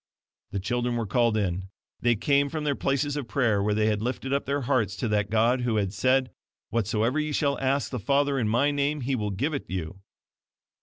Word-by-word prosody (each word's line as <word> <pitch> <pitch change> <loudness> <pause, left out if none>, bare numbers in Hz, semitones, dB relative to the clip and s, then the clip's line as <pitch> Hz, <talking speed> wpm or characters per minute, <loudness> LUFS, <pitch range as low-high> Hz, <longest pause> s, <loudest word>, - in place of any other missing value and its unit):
The 100 -2 -3
children 120 +4 -1
were 115 -1 -1
called 115 +2 +2
in. 95 -2 -2 0.3
They 120 -1 +3
came 140 +5 +2
from 155 +1 -4
their 145 -1 +1
places 140 +1 0
of 145 -5 -4
prayer, 115 -6 +1
where 105 +1 +1
they 105 0 +2
had 105 -1 +1
lifted 130 +3 -2
up 140 - -1
their 140 +1 0
hearts 120 -6 0
to 100 - -2
that 105 -1 +1
God 115 +4 +2
who 120 -2 0
had 100 -3 0
said 130 +5 +2 0.4
"WHATSOEVER 115 +4 +1
YE 155 0 -1
SHALL 140 -1 0
ASK 135 +1 0
THE 125 - -3
FATHER 140 +4 +1
IN 110 -3 0
MY 130 +6 +3
NAME 145 +1 0
HE 130 +2 -1
WILL 105 -4 -2
GIVE 135 +11 -1
IT 140 - -4
YOU." 90 0 -4
120 Hz, 215 wpm, -26 LUFS, 105-140 Hz, 0.4 s, They